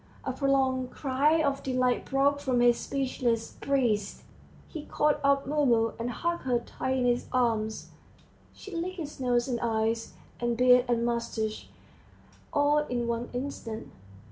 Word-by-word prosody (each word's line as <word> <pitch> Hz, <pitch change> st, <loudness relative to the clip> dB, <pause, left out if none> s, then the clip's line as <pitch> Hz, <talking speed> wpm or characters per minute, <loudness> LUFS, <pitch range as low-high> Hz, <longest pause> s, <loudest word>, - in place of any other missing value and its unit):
A -, -, -1 dB
prolonged 265 Hz, -2 st, +1 dB
cry 290 Hz, +5 st, +1 dB
of 280 Hz, -1 st, 0 dB
delight 255 Hz, -1 st, 0 dB
broke 280 Hz, +1 st, +2 dB
from 260 Hz, -3 st, 0 dB
his 240 Hz, -1 st, +4 dB
speechless 250 Hz, -4 st, -1 dB
breast; 235 Hz, -8 st, 0 dB, 0.4 s
he 310 Hz, -3 st, -8 dB
caught 300 Hz, 0 st, +1 dB
up 275 Hz, 0 st, +3 dB
Mumu, 250 Hz, -6 st, +2 dB
and 235 Hz, +1 st, -2 dB
hugged 340 Hz, +8 st, -2 dB
her 250 Hz, -2 st, +2 dB
tight 260 Hz, +2 st, -3 dB
in 250 Hz, -, +1 dB
his 245 Hz, 0 st, +1 dB
arms, 225 Hz, -3 st, 0 dB, 0.6 s
she 400 Hz, -3 st, -10 dB
licked 365 Hz, +3 st, -3 dB
his 300 Hz, -4 st, -7 dB
nose 245 Hz, -1 st, +1 dB
and 245 Hz, -3 st, -1 dB
eyes, 225 Hz, 0 st, -1 dB, 0.2 s
and 240 Hz, -1 st, -1 dB
beard 250 Hz, 0 st, +6 dB
and 235 Hz, -1 st, +1 dB
moustache, 230 Hz, -2 st, -2 dB, 0.8 s
all 295 Hz, -1 st, +3 dB
in 240 Hz, -1 st, -1 dB
one 235 Hz, +1 st, -2 dB
instant. 245 Hz, -4 st, -5 dB
250 Hz, 145 wpm, -28 LUFS, 235-280 Hz, 0.8 s, beard